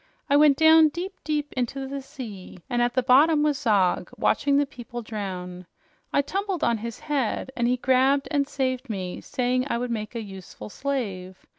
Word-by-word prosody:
I -, -, +6 dB
went 290 Hz, -1 st, +6 dB
down 320 Hz, 0 st, +7 dB
deep, 355 Hz, +5 st, -5 dB
deep 300 Hz, -1 st, -2 dB
into 265 Hz, +2 st, -2 dB
the 275 Hz, +1 st, -5 dB
sea, 225 Hz, -9 st, -9 dB
and 240 Hz, 0 st, +1 dB
at 240 Hz, 0 st, +1 dB
the 255 Hz, -, +2 dB
bottom 295 Hz, +5 st, +5 dB
was 295 Hz, -2 st, +1 dB
Zog, 200 Hz, -9 st, +2 dB
watching 280 Hz, +5 st, +2 dB
the 290 Hz, -, +3 dB
people 240 Hz, -3 st, -8 dB
drown. 185 Hz, -4 st, -6 dB, 0.4 s
I 280 Hz, -, +2 dB
tumbled 385 Hz, +1 st, -2 dB
on 235 Hz, -2 st, +2 dB
his 230 Hz, +1 st, -7 dB
head, 270 Hz, -3 st, -2 dB
and 240 Hz, -1 st, +1 dB
he 250 Hz, +1 st, +2 dB
grabbed 265 Hz, +2 st, +2 dB
and 285 Hz, -2 st, +1 dB
saved 260 Hz, -2 st, -2 dB
me, 185 Hz, -4 st, -4 dB
saying 255 Hz, +1 st, -1 dB
I -, -, 0 dB
would 245 Hz, 0 st, -3 dB
make 215 Hz, 0 st, -4 dB
a 230 Hz, -, -3 dB
useful 195 Hz, 0 st, -10 dB
slave. 200 Hz, -9 st, -4 dB
255 Hz, 185 wpm, -25 LUFS, 220-285 Hz, 0.4 s, down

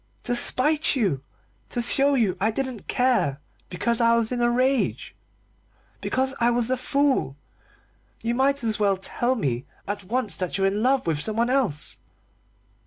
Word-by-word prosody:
"To 245 Hz, -, 0 dB
spite 295 Hz, +6 st, +1 dB
you 190 Hz, -, 0 dB, 0.5 s
to -, -, -3 dB
show 275 Hz, +4 st, +3 dB
you 215 Hz, -8 st, +1 dB
I 215 Hz, -, +3 dB
didn't 255 Hz, -1 st, -4 dB
care 245 Hz, -, +1 dB, 0.3 s
because 235 Hz, +6 st, 0 dB
I 230 Hz, 0 st, +5 dB
was 230 Hz, 0 st, -1 dB
in 245 Hz, -1 st, -1 dB
a 240 Hz, -, +3 dB
rage 255 Hz, +2 st, 0 dB, 0.9 s
because 265 Hz, +1 st, 0 dB
I 235 Hz, -, +4 dB
was 240 Hz, 0 st, 0 dB
a -, -, +3 dB, 0.2 s
fool! 280 Hz, -, +1 dB, 0.9 s
You 230 Hz, +1 st, 0 dB
might 275 Hz, +2 st, +1 dB
as 220 Hz, -2 st, -1 dB
well 200 Hz, -2 st, +2 dB
tell 240 Hz, +6 st, -1 dB
me 130 Hz, -, -2 dB, 0.2 s
at 205 Hz, 0 st, -4 dB
once 230 Hz, +1 st, -1 dB
that 185 Hz, 0 st, -2 dB
you're 195 Hz, -, +1 dB
in 200 Hz, +2 st, 0 dB
love 260 Hz, +2 st, +2 dB
with 155 Hz, -3 st, -1 dB
someone 230 Hz, +6 st, 0 dB
else." 250 Hz, -, 0 dB
235 Hz, 165 wpm, -24 LUFS, 200-260 Hz, 0.9 s, I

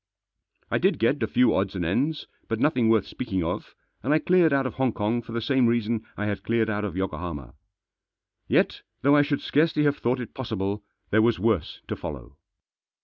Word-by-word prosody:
I -, -, +2 dB
did -, -, +2 dB
get -, -, +1 dB
a -, -, +1 dB
few 125 Hz, -, +3 dB
odds 95 Hz, +1 st, 0 dB
and 90 Hz, -2 st, -2 dB
ends, 140 Hz, -, 0 dB, 0.2 s
but 115 Hz, -, -2 dB
nothing 125 Hz, -6 st, +2 dB
worth 110 Hz, -3 st, +3 dB
speaking 95 Hz, -8 st, -3 dB
of, 85 Hz, +2 st, -4 dB, 0.3 s
and 140 Hz, -, -1 dB
I -, -, +6 dB
cleared 175 Hz, 0 st, +3 dB
out 135 Hz, -1 st, +2 dB
of 130 Hz, -, -3 dB
Hong 130 Hz, -3 st, 0 dB
Kong 110 Hz, +3 st, 0 dB
for 115 Hz, -, -11 dB
the 115 Hz, -, -2 dB
same 130 Hz, -1 st, +3 dB
reason 115 Hz, -1 st, 0 dB
I 105 Hz, -, -2 dB
had 105 Hz, -1 st, -2 dB
cleared 115 Hz, -1 st, +1 dB
out 105 Hz, 0 st, -2 dB
of 95 Hz, -4 st, -4 dB
Yokohama* 85 Hz, -7 st, -4 dB, 0.9 s
Yet, -, -, +2 dB, 0.2 s
though 140 Hz, +2 st, +5 dB
I 145 Hz, -, +6 dB
should 145 Hz, -1 st, 0 dB
scarcely 150 Hz, 0 st, +2 dB
have 145 Hz, -1 st, +2 dB
thought 125 Hz, +2 st, 0 dB
it 120 Hz, -, -7 dB
possible, 105 Hz, -5 st, -3 dB, 0.3 s
there 110 Hz, -, +5 dB
was 115 Hz, 0 st, +3 dB
worse 105 Hz, -5 st, 0 dB
to -, -, -3 dB
follow. -, -, -8 dB
115 Hz, 205 wpm, -25 LUFS, 105-135 Hz, 0.9 s, I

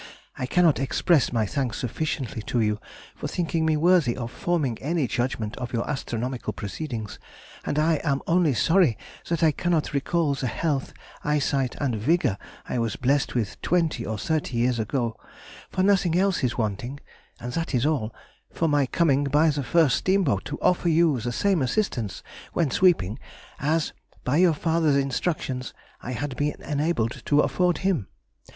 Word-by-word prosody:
I 125 Hz, -, -3 dB
cannot 175 Hz, 0 st, +3 dB
express 140 Hz, +2 st, +2 dB
my 115 Hz, -3 st, +1 dB
thanks 125 Hz, +1 st, -2 dB
sufficiently 130 Hz, -1 st, -3 dB
to 120 Hz, -, 0 dB
you 105 Hz, -1 st, +1 dB, 0.4 s
for -, -, -5 dB
thinking 165 Hz, -2 st, -1 dB
me 155 Hz, -1 st, +2 dB
worthy 165 Hz, -6 st, +3 dB
of 115 Hz, -2 st, -4 dB
forming 150 Hz, -10 st, -1 dB
any 155 Hz, +1 st, 0 dB
judgment 120 Hz, -3 st, -2 dB
of 125 Hz, -1 st, -5 dB
your 115 Hz, -, -1 dB
astronomical 125 Hz, -3 st, -3 dB
proceedings, 110 Hz, 0 st, -5 dB, 0.5 s
and -, -, -2 dB
am 150 Hz, -3 st, +1 dB
only 165 Hz, -5 st, +3 dB
sorry 165 Hz, -, +3 dB, 0.3 s
that 170 Hz, -1 st, 0 dB
I 160 Hz, -, +6 dB
cannot 165 Hz, 0 st, 0 dB
recall 145 Hz, +2 st, +1 dB
the 135 Hz, -1 st, -2 dB
health, 140 Hz, +3 st, -1 dB, 0.3 s
eyesight, 140 Hz, -3 st, 0 dB
and 135 Hz, -5 st, 0 dB
vigor 110 Hz, -, +1 dB, 0.3 s
I 125 Hz, -, -2 dB
was 115 Hz, -2 st, -1 dB
blessed 135 Hz, +1 st, +1 dB
with 110 Hz, -5 st, -2 dB
twenty 165 Hz, -8 st, +1 dB
or 110 Hz, -1 st, -3 dB
thirty 150 Hz, +1 st, -1 dB
years 120 Hz, 0 st, +1 dB
ago; 115 Hz, +1 st, -1 dB, 0.5 s
for 185 Hz, -, 0 dB
nothing 190 Hz, -4 st, +3 dB
else 190 Hz, -3 st, +1 dB
is 125 Hz, 0 st, 0 dB
wanting 120 Hz, +5 st, -3 dB, 0.4 s
(and 125 Hz, +1 st, -6 dB
that 165 Hz, -4 st, -2 dB
is 125 Hz, +2 st, +2 dB
all) 135 Hz, -8 st, 0 dB, 0.4 s
for 165 Hz, -, 0 dB
my 145 Hz, -3 st, +2 dB
coming 145 Hz, -2 st, +2 dB
by 150 Hz, +3 st, +3 dB
the 145 Hz, 0 st, -2 dB
first 155 Hz, 0 st, +3 dB
steamboat 185 Hz, -, +1 dB
to 145 Hz, -, -4 dB
offer 180 Hz, -1 st, +3 dB
you 160 Hz, -4 st, +3 dB
the 120 Hz, +2 st, -2 dB
same 190 Hz, +6 st, +1 dB
assistance 125 Hz, -, -1 dB, 0.3 s
(when 160 Hz, -6 st, +1 dB
sweeping) 140 Hz, -, +3 dB, 0.4 s
as, 155 Hz, +2 st, 0 dB, 0.3 s
by 125 Hz, +4 st, +1 dB
your 175 Hz, -2 st, +5 dB
father's 160 Hz, -2 st, +2 dB
instructions, 135 Hz, -2 st, -1 dB, 0.3 s
I 125 Hz, -, -5 dB
had 140 Hz, +1 st, -3 dB
been 145 Hz, 0 st, -1 dB
enabled 145 Hz, -6 st, -1 dB
to 145 Hz, 0 st, +5 dB
afford 180 Hz, +1 st, +1 dB
him. 165 Hz, -, +1 dB
140 Hz, 165 wpm, -25 LUFS, 125-165 Hz, 0.5 s, I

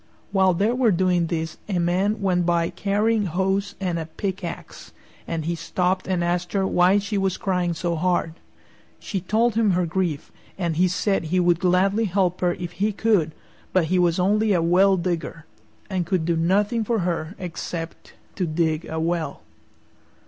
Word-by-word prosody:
While 190 Hz, -2 st, +3 dB
they 205 Hz, +6 st, +2 dB
were 250 Hz, -1 st, +2 dB
doing 180 Hz, -2 st, +2 dB
this 160 Hz, -1 st, -3 dB
a 190 Hz, -, 0 dB
Man 185 Hz, +5 st, +1 dB
went 180 Hz, -2 st, +2 dB
by 170 Hz, -1 st, +1 dB
carrying 210 Hz, +1 st, +1 dB
hoes 195 Hz, +3 st, -1 dB
and 180 Hz, -3 st, -1 dB
a 160 Hz, -, -5 dB
pickaxe, 180 Hz, +1 st, -6 dB, 0.3 s
and 165 Hz, -2 st, -3 dB
he 170 Hz, -, 0 dB
stopped 180 Hz, +2 st, -1 dB
and 185 Hz, -2 st, 0 dB
asked 175 Hz, 0 st, -1 dB
her 195 Hz, -1 st, +1 dB
why 185 Hz, +1 st, +4 dB
she 205 Hz, 0 st, -1 dB
was 190 Hz, -1 st, 0 dB
crying 180 Hz, -3 st, -1 dB
so 170 Hz, 0 st, -1 dB
hard. 175 Hz, -1 st, 0 dB, 0.7 s
She 195 Hz, -, -4 dB
told 220 Hz, +6 st, +1 dB
him 215 Hz, -3 st, +2 dB
her 180 Hz, -, +1 dB
grief, 170 Hz, -3 st, -2 dB, 0.3 s
and 170 Hz, -4 st, -1 dB
he 180 Hz, +3 st, +3 dB
said 195 Hz, 0 st, 0 dB
he 180 Hz, +4 st, +1 dB
would 175 Hz, -1 st, +3 dB
gladly 195 Hz, +4 st, +2 dB
help 185 Hz, -2 st, 0 dB
her 175 Hz, -1 st, +1 dB
if 175 Hz, -1 st, -6 dB
he 200 Hz, +5 st, 0 dB
could, 195 Hz, -7 st, +1 dB, 0.4 s
but 185 Hz, -3 st, +3 dB
he 185 Hz, -, +3 dB
was 175 Hz, -2 st, +2 dB
only 210 Hz, +3 st, +2 dB
a 175 Hz, -, +2 dB
well 190 Hz, +3 st, +4 dB
digger 170 Hz, -2 st, -3 dB, 0.4 s
and 185 Hz, -3 st, -1 dB
could 170 Hz, -1 st, -1 dB
do 170 Hz, 0 st, +1 dB
nothing 200 Hz, +7 st, +1 dB
for 225 Hz, -1 st, 0 dB
her 170 Hz, 0 st, -2 dB
except 170 Hz, -1 st, -6 dB, 0.2 s
to 180 Hz, -3 st, 0 dB
dig 160 Hz, 0 st, 0 dB
a 160 Hz, 0 st, -3 dB
well. 165 Hz, 0 st, -2 dB
180 Hz, 180 wpm, -23 LUFS, 170-195 Hz, 0.7 s, why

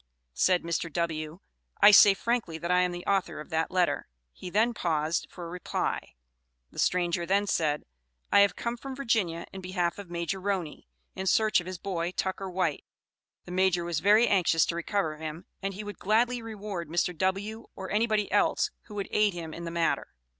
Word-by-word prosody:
Said 180 Hz, -, +2 dB
Mr. 170 Hz, 0 st, -2 dB
W., 160 Hz, +1 st, -3 dB, 0.4 s
"I 205 Hz, -, +9 dB
say 200 Hz, -1 st, +8 dB
frankly 230 Hz, -7 st, -1 dB
that 170 Hz, +2 st, -3 dB
I 180 Hz, -, +4 dB
am 180 Hz, 0 st, +1 dB
the 175 Hz, 0 st, -7 dB
author 195 Hz, -5 st, 0 dB
of 150 Hz, -, -10 dB
that 160 Hz, 0 st, 0 dB
letter." 180 Hz, -1 st, +1 dB, 0.2 s
He 180 Hz, -, -8 dB
then 220 Hz, +6 st, +2 dB
paused 160 Hz, -4 st, -1 dB
for 175 Hz, -, -9 dB
a -, -, -6 dB
reply. 180 Hz, 0 st, -3 dB, 0.6 s
The -, -, -9 dB
stranger 175 Hz, -1 st, +1 dB
then 200 Hz, +2 st, +2 dB
said, 155 Hz, -6 st, 0 dB, 0.5 s
"I -, -, +6 dB
have 200 Hz, 0 st, +5 dB
come 235 Hz, 0 st, -3 dB
from 270 Hz, +2 st, -7 dB
Virginia 210 Hz, -11 st, 0 dB
in 190 Hz, -, -7 dB
behalf 180 Hz, -1 st, -1 dB
of 200 Hz, -3 st, -9 dB
Major 175 Hz, +2 st, -3 dB
Roney, 185 Hz, -, -3 dB, 0.3 s
in 190 Hz, -, -4 dB
search 215 Hz, +1 st, +4 dB
of 175 Hz, -, -11 dB
his 185 Hz, -1 st, -5 dB
boy, 175 Hz, -1 st, -3 dB
Tucker 190 Hz, +1 st, -2 dB
White; 180 Hz, -5 st, -1 dB, 0.6 s
the 175 Hz, -, -9 dB
Major 185 Hz, -1 st, +2 dB
was 170 Hz, -3 st, -1 dB
very 210 Hz, +6 st, +5 dB
anxious 170 Hz, -5 st, +3 dB
to 170 Hz, -, -2 dB
recover 170 Hz, -2 st, -1 dB
him, 160 Hz, +3 st, -6 dB, 0.2 s
and 195 Hz, -1 st, -3 dB
he 210 Hz, -, -6 dB
would 205 Hz, 0 st, -8 dB
gladly 235 Hz, +4 st, +2 dB
reward 205 Hz, -7 st, -6 dB
Mr. 175 Hz, +2 st, 0 dB
W. 200 Hz, +5 st, -2 dB
or 190 Hz, -1 st, -7 dB
anybody 215 Hz, 0 st, +1 dB
else -, -, +2 dB
who 210 Hz, -, -11 dB
would 200 Hz, -1 st, -3 dB
aid 210 Hz, -3 st, +2 dB
him 165 Hz, -2 st, -6 dB
in 170 Hz, +1 st, -7 dB
the -, -, -3 dB
matter." 170 Hz, 0 st, 0 dB
185 Hz, 195 wpm, -28 LUFS, 170-205 Hz, 0.6 s, I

